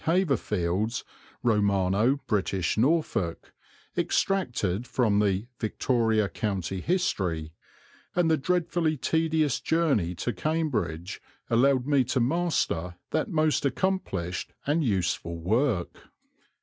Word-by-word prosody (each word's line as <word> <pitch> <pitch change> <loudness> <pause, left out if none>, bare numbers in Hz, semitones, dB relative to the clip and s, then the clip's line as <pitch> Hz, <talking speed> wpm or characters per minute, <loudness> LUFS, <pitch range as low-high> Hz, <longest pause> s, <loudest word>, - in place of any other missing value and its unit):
Haverfield's 115 - 0 0.4
Romano 105 +1 +2
British 95 -3 0
Norfolk, 115 - 0 0.4
extracted 120 - 0
from 110 -5 +2
the 100 0 +1
"Victoria 110 -1 +1
County 95 -1 -3
History," 90 - -1 0.6
and 175 -2 +3
the - - +5
dreadfully 165 0 0
tedious 160 0 +1
journey 140 - +1
to 115 +8 -2
Cambridge 105 - -2 0.3
allowed 130 +2 +3
me 140 -2 +3
to 130 +2 0
master 125 - 0 0.2
that 155 - 0
most 155 -2 +2
accomplished 125 - -1
and 155 +3 +1
useful 85 -6 -1
work. 105 - 0
115 Hz, 95 wpm, -27 LUFS, 95-155 Hz, 0.6 s, the